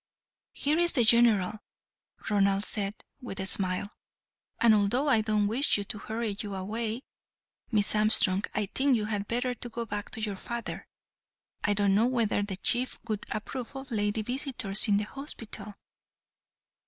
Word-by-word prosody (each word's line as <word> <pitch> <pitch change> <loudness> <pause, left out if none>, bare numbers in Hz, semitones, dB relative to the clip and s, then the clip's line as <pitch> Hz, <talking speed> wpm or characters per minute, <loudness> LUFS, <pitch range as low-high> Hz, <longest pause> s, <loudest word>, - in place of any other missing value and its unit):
"Here 300 +3 0
is 345 0 +3
the 245 - +3
General," 220 -3 +4 0.7
Ronald 200 -1 +2
said, 200 -1 0 0.3
with 240 -6 -7
a 190 - -2
smile, 190 +1 0 0.7
"and 230 -2 +5
although 215 +7 +2
I 230 -6 +4
don't 215 -1 +1
wish 235 +8 +3
to 205 +1 -4
hurry 220 0 -3
you 205 -2 -5
away, 220 +5 -4 0.7
Miss 210 -3 +3
Armstrong, 210 -2 +4
I 210 - +1
think 265 +6 +1
you 210 - -2
had 205 -2 -3
better 245 +2 -1
go 235 -1 -6
back 205 -1 -5
to - - -3
your 210 -3 -3
father. 235 +3 -6 0.8
I 205 - +1
don't 200 -1 +2
know 220 +4 +3
whether 230 -5 +1
the 200 -2 -4
Chief 245 +5 0
would 215 -2 -4
approve 240 +4 -5
of 270 -1 -8
lady 210 0 -1
visitors 245 -4 +2
in 205 -1 +3
the 210 - 0
hospital." 215 -5 -4
215 Hz, 155 wpm, -28 LUFS, 205-240 Hz, 0.8 s, and